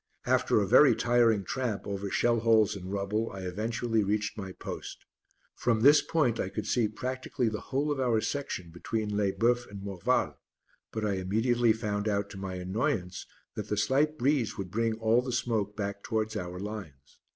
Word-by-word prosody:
After - - +3
a 100 - 0
very 125 +4 +7
tiring 115 -2 +3
tramp 120 0 -3
over 100 0 -3
shell 120 +3 +2
holes 110 -2 +4
and 95 -1 -7
rubble 100 +3 -1
I 95 - -7
eventually 110 +4 -1
reached 105 +1 -1
my 95 -3 -6
post. - - -8 0.5
From 115 -2 +1
this 145 +4 +7
point 145 -9 +1
I 95 - -1
could - - -4
see 120 -3 +2
practically 130 +2 -2
the 105 -1 -4
whole 140 +3 -1
of 145 - -2
our 120 -4 +2
section 110 - -3
between 105 +5 -3
Lesboeufs 115 +4 +1
and 100 -1 -9
Morval, 95 -3 0 0.5
but 110 -1 -2
I 100 -2 0
immediately 115 +5 +2
found 105 -2 -2
out 100 -1 -1
to - - -9
my 95 -1 -5
annoyance 90 0 -2 0.3
that 105 -1 -6
the 105 - -1
slight 145 +8 +2
breeze 135 -3 +1
would 95 -3 -5
bring 115 0 0
all 115 +2 +3
the 125 0 -4
smoke 115 -5 -1
back 100 -1 -3
towards 110 -1 -2
our 90 0 -4
lines. 90 -10 -8
110 Hz, 180 wpm, -29 LUFS, 100-120 Hz, 0.5 s, very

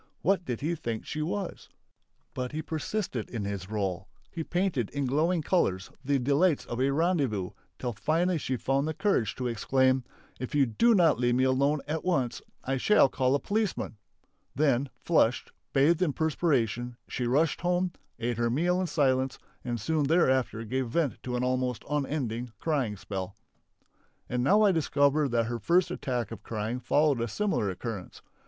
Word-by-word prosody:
What 190 +1 +2
did 125 0 -3
he 160 +4 0
think 115 -8 -4
she 155 - -4
was! 185 +4 -4 0.6
But 125 +1 -4
he 155 +1 -3
persisted 160 - -3
in 110 -4 -4
his 100 -2 -4
role; 95 -3 -2 0.2
he 165 - -4
painted 175 - 0
in 140 -1 -2
glowing 155 +6 +1
colours 95 - 0
the 140 +1 +2
delights 145 +5 +2
of 120 +2 -3
a 135 - +3
rendezvous, 140 - 0 0.3
till 125 -2 -3
finally 165 - +1
she 130 - -2
found 135 +4 0
the 160 - -3
courage 145 - +1
to 125 - -4
exclaim: 130 +2 +2 0.4
"If 130 +4 -4
you 140 -2 +5
do 225 - +3
not 165 - +4
leave 120 -1 +2
me 130 - +3
at 140 +3 +1
once, 135 -10 0 0.2
I 135 +1 -1
shall 210 +1 +5
call 130 +1 +1
a - - +1
policeman!" 205 - -2 0.6
Then, 140 -2 +2
flushed, 130 -7 +1 0.2
bathed 155 +5 +3
in 165 -6 +2
perspiration, 125 - 0
she 125 -2 -2
rushed 145 +6 +2
home, 180 +1 +1 0.3
ate 120 0 -2
her 120 0 +1
meal 175 +8 +1
in 185 - -1
silence 130 -4 +1 0.3
and 120 -2 -3
soon 150 +7 0
thereafter 130 -8 +2
gave 130 +3 -2
vent 145 +3 -1
to 125 -1 -4
an 125 - 0
almost 125 -1 -1
unending 135 -5 -2
crying 135 -10 -1
spell. 95 0 -5 0.9
And 125 0 -1
now 205 +10 +5
I 205 - +6
discover 145 -3 +2
that 115 -1 +1
her 120 +1 -3
first 180 +4 +2
attack 125 - -2
of - - -7
crying 110 +2 -3
followed 140 +1 +2
a 115 - 0
similar 120 - 0
occurrence. 95 0 -6
135 Hz, 170 wpm, -28 LUFS, 120-160 Hz, 0.9 s, I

